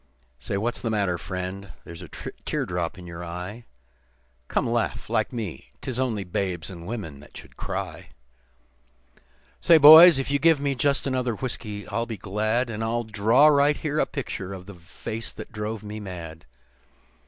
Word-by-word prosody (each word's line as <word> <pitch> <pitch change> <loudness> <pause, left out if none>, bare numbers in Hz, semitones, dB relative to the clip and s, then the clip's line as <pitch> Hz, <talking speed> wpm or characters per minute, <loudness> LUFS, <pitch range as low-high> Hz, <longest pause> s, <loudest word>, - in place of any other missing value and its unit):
Why, 100 - -1
what's 115 +4 -2
the 115 - -2
matter, 100 -5 0
friend? 95 -1 -6
There's 85 0 -10
a - - -9
tear - - -5
drop 90 -1 -3
in 90 - -10
you 85 0 -8
eye, 90 +7 -7 0.8
Come, - - 0
laugh - - -2
like - - +1
me. 100 - -6
'Tis 130 -1 -4
only 115 -6 -1
babes 90 -1 -3
and 85 -1 -9
women 100 -11 -6
that 75 - -14
should - - -13
cry. - - -5 1.5
"Say, 170 - +7
boys, 160 +2 +10
if 135 +1 -2
you 140 - +2
give 160 0 +4
me 140 0 0
just 140 +2 +1
another 130 -3 -1
whiskey 105 -4 -5
I'll 115 +3 -2
be 115 -3 -5
glad, 110 +5 0
And 110 0 -4
I'll 120 +1 -1
draw 110 +5 +3
right 145 -1 +5
here 155 -1 -2
a - - +2
picture 100 -8 -5
of 90 -1 -9
the 100 - -10
face 95 +6 -7
that - - -9
drove 110 -1 -4
me 105 +1 -6
mad. 85 -6 -8
110 Hz, 175 wpm, -25 LUFS, 90-125 Hz, 1.5 s, boys